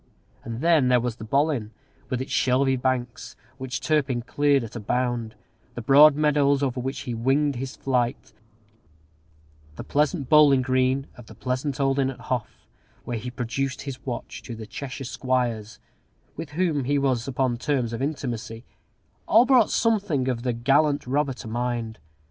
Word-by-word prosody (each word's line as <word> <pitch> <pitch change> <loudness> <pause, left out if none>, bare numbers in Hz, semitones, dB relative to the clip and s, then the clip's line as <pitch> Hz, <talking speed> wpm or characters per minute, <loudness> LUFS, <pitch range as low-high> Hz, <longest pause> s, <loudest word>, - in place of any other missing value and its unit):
And 115 +1 -6
then 160 -5 +4
there 125 -1 +4
was 120 -1 -3
the 110 - -9
Bollin, 135 -1 0 0.4
with 130 -1 -2
its - - -11
shelvy 130 +1 +2
banks, 125 -1 -2 0.2
which 130 -1 -4
Turpin 135 -6 0
cleared 140 +1 +2
at 115 0 -9
a - - -4
bound; 120 0 -2 0.4
the 120 - -4
broad 140 +4 +7
meadows 145 -2 +2
over 130 -2 -1
which 130 +2 -4
he 120 - -5
winged 135 +4 +1
his 130 +1 -5
flight; 125 -1 -1 1.4
the - - -7
pleasant 150 -1 0
bowling 145 -3 +6
green 130 +1 +1
of 120 -2 -13
the - - -13
pleasant 130 +2 -3
old 135 0 +1
inn 135 -1 +2
at 135 - -8
Hough, 125 -4 -4 0.4
where 120 -2 -4
he 125 - -6
produced 125 +2 -3
his 135 -2 -7
watch 125 -3 -6
to 120 - -8
the 110 0 -8
Cheshire 135 +4 -7
squires, 120 -5 -2 0.6
with 160 - -6
whom 160 -5 0
he 145 +2 +1
was 130 -3 0
upon 130 -2 0
terms 125 -4 -1
of 115 - -4
intimacy; 125 -5 -4 0.6
all 230 +3 +6
brought 250 -4 +5
something 200 - +1
of 125 -3 -1
the 125 0 -1
gallant 140 +5 +2
robber 135 +2 0
to 125 - -10
mind. 120 -1 -3
130 Hz, 165 wpm, -25 LUFS, 120-140 Hz, 1.4 s, broad